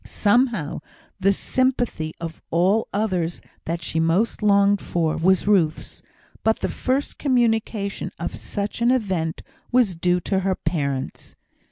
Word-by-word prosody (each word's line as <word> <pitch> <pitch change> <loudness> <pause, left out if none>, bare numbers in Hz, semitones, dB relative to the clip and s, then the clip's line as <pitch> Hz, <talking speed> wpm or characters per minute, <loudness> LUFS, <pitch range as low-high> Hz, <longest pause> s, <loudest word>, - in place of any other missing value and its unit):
Somehow, 215 - +1 0.4
the 195 - +4
sympathy 245 -8 0
of 165 -1 -7
all 185 +6 +2
others 185 -5 -1 0.3
that 170 0 -3
she 160 - -1
most 170 +10 +1
longed 200 -1 +4
for 165 -2 0
was 185 +3 +2
Ruth's; 185 -7 +1 0.4
but 220 0 +1
the - - 0
first 265 +2 -2
communication 225 -6 0
of - - -4
such 205 +2 -4
an 235 - +4
event 190 -10 0 0.3
was 240 -6 +3
due 175 +1 +1
to 190 +2 0
her 190 0 0
parents. 140 -6 -3
195 Hz, 135 wpm, -23 LUFS, 165-225 Hz, 0.4 s, the